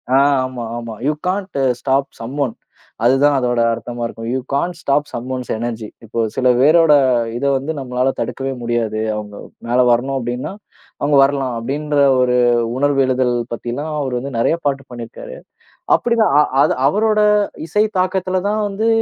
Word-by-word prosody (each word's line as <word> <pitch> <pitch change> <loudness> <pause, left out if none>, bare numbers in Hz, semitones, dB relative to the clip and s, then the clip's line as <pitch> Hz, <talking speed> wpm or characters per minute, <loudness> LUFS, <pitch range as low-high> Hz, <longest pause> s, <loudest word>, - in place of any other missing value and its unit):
ஆ. - - +6 0.3
ஆமா, 130 -2 -6
ஆமா. 115 -1 -6
You 150 - +2
can't 190 -3 -2 0.2
stop 135 0 +1
some 130 +6 -6
one 115 - -5 0.5
அதுதான் 140 +3 +4
அதோட 120 -1 0
அர்த்தமா 120 +1 -6
இருக்கும். 115 0 -6
You 130 - 0
can't 170 +5 -1
stop 145 +1 0
some 120 +1 -5
once 125 -1 -6
energy 115 -1 -4 0.2
இப்போ 115 +1 -5 0.2
சில 130 - +1
பேரோட 155 +2 +5 0.4
இதை 140 +2 0
வந்து 140 +4 -4
நம்மளால 125 0 0
தடுக்கவே 135 0 -3
முடியாது. 115 -2 -1 0.2
அவங்க 105 -1 -7 0.3
மேல 120 +2 +1
வரணும் 130 +3 +1
அப்படின்னா 120 +1 -4 0.5
அவங்க 145 0 +2
வரலாம். 135 -2 0
அப்படின்ற 145 +4 -2 0.2
ஒரு 125 0 +2 0.4
உணர்வு 140 0 +2
எழுதல் 130 -1 +1 0.2
பத்தில்லாம் 125 +6 -4
அவர் 130 -3 -2
வந்து 140 +3 -6
நிறைய 165 - +2
பாட்டு 135 -1 -1
பண்ணியிருக்கார். 120 - -8 0.6
அப்படிதான் 230 -7 +1
அ - - +6 0.2
அது - - +2
அவரோட 215 +4 +2 0.5
இசை 210 +6 +2
தாக்கத்துல 185 0 0
தான் 215 +1 0
வந்து 210 +3 -1
135 Hz, 160 wpm, -18 LUFS, 120-150 Hz, 0.6 s, ஆ